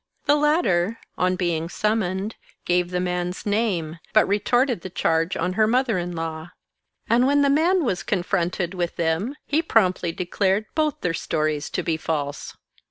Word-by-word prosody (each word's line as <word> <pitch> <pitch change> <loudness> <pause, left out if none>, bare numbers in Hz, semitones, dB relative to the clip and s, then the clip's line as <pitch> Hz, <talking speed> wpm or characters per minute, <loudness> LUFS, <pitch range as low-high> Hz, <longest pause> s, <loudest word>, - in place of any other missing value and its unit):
The 290 - +5
latter, 230 - +2 0.2
on 185 0 +1
being 170 -3 -1
summoned, 210 0 -1 0.3
gave 180 0 +1
the 180 0 -1
man's 180 0 -2
name, 195 -7 -1
but 215 - +5
re 205 +1 +1
torted 245 -2 +1
the 185 - -7
charge 165 0 0
on 180 +2 -1
her 215 +2 +3
mother 240 -4 +2
in 175 0 -4
law; 165 0 -5 0.6
and 245 +3 +4
when 285 +1 +4
the 280 - +3
man 335 +5 +3
was 190 -6 -1
confronted 175 -1 -1
with 175 -2 -2
them, 170 - -1
he 300 +3 +1
promptly 185 - +2
declared 190 +4 0
both 305 -2 0
their 180 - 0
stories 155 -2 -1
to - - -2
be 165 -2 0
false. 145 -3 -4
185 Hz, 165 wpm, -23 LUFS, 170-225 Hz, 0.6 s, The